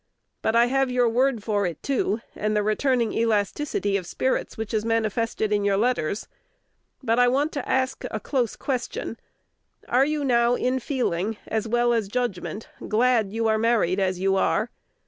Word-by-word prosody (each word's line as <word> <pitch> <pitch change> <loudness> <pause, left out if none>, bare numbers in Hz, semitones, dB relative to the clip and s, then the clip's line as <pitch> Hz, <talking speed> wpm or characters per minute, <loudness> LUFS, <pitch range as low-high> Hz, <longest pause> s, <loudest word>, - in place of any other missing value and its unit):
But 220 - 0
I 235 +1 +6
have 270 +1 +1
your 250 -1 +2
word 240 -1 +1
for 205 -3 0
it, 170 -3 -7
too, 240 -5 0
and 215 0 -1
the 210 - +2
returning 235 +2 +1
elasticity 210 -1 0
of 180 -3 -6
spirits 260 +7 -1
which 220 0 -5
is 215 -1 +1
manifested 225 -1 0
in 205 -1 +1
your 200 -1 +2
letters. 220 -4 0 0.8
But 230 -1 +2
I 245 - +6
want 280 +5 +1
to 285 -4 -5
ask 260 0 0
a - - -3
close 250 -6 -1
question, 280 - -4 0.7
"Are 255 +2 +4
you 300 -1 -1
now 240 -1 +3
in 255 +1 0
feeling, 225 - -1
as 220 0 -2
well 240 +1 +2
as 225 -4 0
judgment, 220 -2 -3 0.2
glad 225 -2 +2
you 225 +1 0
are 220 0 +2
married 220 -5 +2
as 185 -2 0
you 195 +1 +2
are?" - - +1
230 Hz, 175 wpm, -25 LUFS, 210-250 Hz, 0.8 s, I